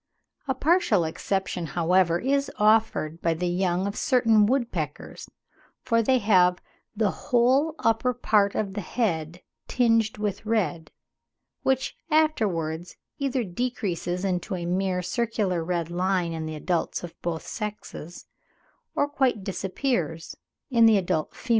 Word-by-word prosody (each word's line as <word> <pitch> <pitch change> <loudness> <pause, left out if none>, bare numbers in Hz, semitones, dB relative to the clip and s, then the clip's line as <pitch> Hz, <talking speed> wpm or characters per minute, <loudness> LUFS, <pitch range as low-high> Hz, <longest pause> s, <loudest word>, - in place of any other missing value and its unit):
A 265 - 0
partial 275 - +3
exception, 180 +1 -2
however, 170 0 +3
is 275 +7 0
offered 210 -7 +2
by 165 -1 +1
the 180 +3 -2
young 180 +1 0
of 200 - -3
certain 230 -7 +3
woodpeckers, 220 - -3 0.5
for 230 -2 +2
they 260 +3 +3
have 185 -5 +4 0.4
"the 210 -2 +1
whole 260 +6 +2
upper 225 +2 +1
part 210 -4 +2
of 200 -3 -2
the 205 - -3
head 175 -6 -2 0.2
tinged 225 -3 +2
with 210 -1 -3
red," 185 -8 -1 0.7
which 265 0 0
afterwards 185 - 0 0.2
either 270 -3 0
decreases 185 -4 -3
into 185 +1 -1
a 175 -1 -4
mere 180 +1 0
circular 210 -5 -1
red 170 -1 -2
line 180 -1 0
in 160 -1 -4
the 155 - -5
adults 170 +3 -2
of 175 - -7
both 165 -2 -3
sexes, 210 -6 -7 0.7
or 285 - +2
quite 265 -8 0
disappears 185 - -2 0.4
in 230 -2 +6
the 220 -2 +6
adult 175 -5 -1
females. - - -13
195 Hz, 135 wpm, -26 LUFS, 175-235 Hz, 0.7 s, in